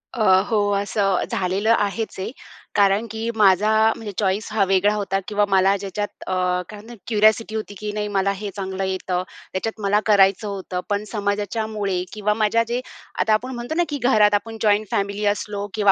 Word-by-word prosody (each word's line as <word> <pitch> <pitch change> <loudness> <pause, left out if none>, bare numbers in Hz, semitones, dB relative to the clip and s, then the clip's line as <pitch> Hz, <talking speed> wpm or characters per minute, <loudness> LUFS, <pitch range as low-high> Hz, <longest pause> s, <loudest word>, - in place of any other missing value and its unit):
अ, 235 - -3 0.3
हो. 220 - +2 0.2
असं 200 -1 0
झालेलं 195 +5 +1
आहेच 205 0 -2
आहे. 190 - -4 0.4
कारण 200 +2 +3
की 220 +1 -3
माझा 205 0 +4 0.3
म्हणजे 215 -2 -7
चॉईस 200 +1 0
हा 215 -2 +2
वेगळा 195 +2 +3
होता 195 -2 -1
किंवा 205 0 +1
मला 195 +1 +4
ज्याच्यात 200 +1 -3 0.2
अ, 185 - -1 0.4
काय 210 - -9
म्हणतात 230 +3 -12
क्युरिऑसिटी 220 0 +3
होती 215 -1 -4
की 210 0 -4
नाही 210 0 -2
मला 195 -1 +1
हे 205 +1 -5
चांगलं 190 -1 -4
येतं. 185 -1 -2 0.3
त्याच्यात 220 +4 -3
मला 205 +1 +2
करायचं 200 0 +4
होतं. 190 -2 -4
पण 205 0 0
समाजाच्यामुळे 205 -2 -2
किंवा 210 0 0
माझ्या 220 +1 +2
जे, 240 +1 -1 0.4
आता 220 - +3
आपण 250 +4 0
म्हणतो 240 +6 -5
ना 350 - +3
की 295 - -2
घरात 215 -4 +4
आपण 225 +2 -1
जॉइंट 210 0 +3
फॅमिली 200 +1 -1
असलो 205 -1 -5
किंवा 205 -3 +4
205 Hz, 180 wpm, -22 LUFS, 195-220 Hz, 0.4 s, माझा